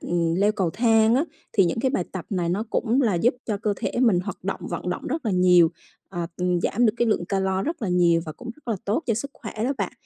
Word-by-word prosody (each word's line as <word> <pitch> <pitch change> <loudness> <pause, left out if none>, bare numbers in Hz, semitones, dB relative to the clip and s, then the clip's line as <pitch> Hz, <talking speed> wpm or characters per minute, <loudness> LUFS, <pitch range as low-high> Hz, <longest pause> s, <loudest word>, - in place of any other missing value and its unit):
ừm, 170 -1 0
leo 200 +4 +3
cầu 190 -5 0
thang 225 +2 +3
á. 275 +6 +2 0.3
Thì 195 - +4
những 175 +6 -1
cái 260 - +1
bài 185 -10 -1
tập 185 -3 -5
này 180 -4 -1
nó 195 +5 0
cũng 245 +3 +1
là 220 -6 +2
giúp 230 +9 +2
cho 215 - -1
cơ 210 +1 -1
thể - - -3
mình 220 -8 +4
hoạt 200 +3 -7
động - - -3
vận - - -4
động - - -4
rất 320 -6 -3
là - - +1
nhiều, 180 -2 +5 0.4
à, 175 -3 -4 0.4
giảm 240 +3 +2
được 215 - +3
cái 240 - +1
lượng 210 -5 +1
calo 190 0 0
rất 325 -3 -4
là 205 - -1
nhiều 175 -2 +3
và 155 - -5
cũng 245 +8 -9
rất 300 -5 -17
là 225 - 0
tốt 215 +10 0
cho 230 - +2
sức 280 +6 -4
khỏe 220 - -8
đó 265 - +1
bạn. - - -2
205 Hz, 270 wpm, -24 LUFS, 180-235 Hz, 0.4 s, nhiều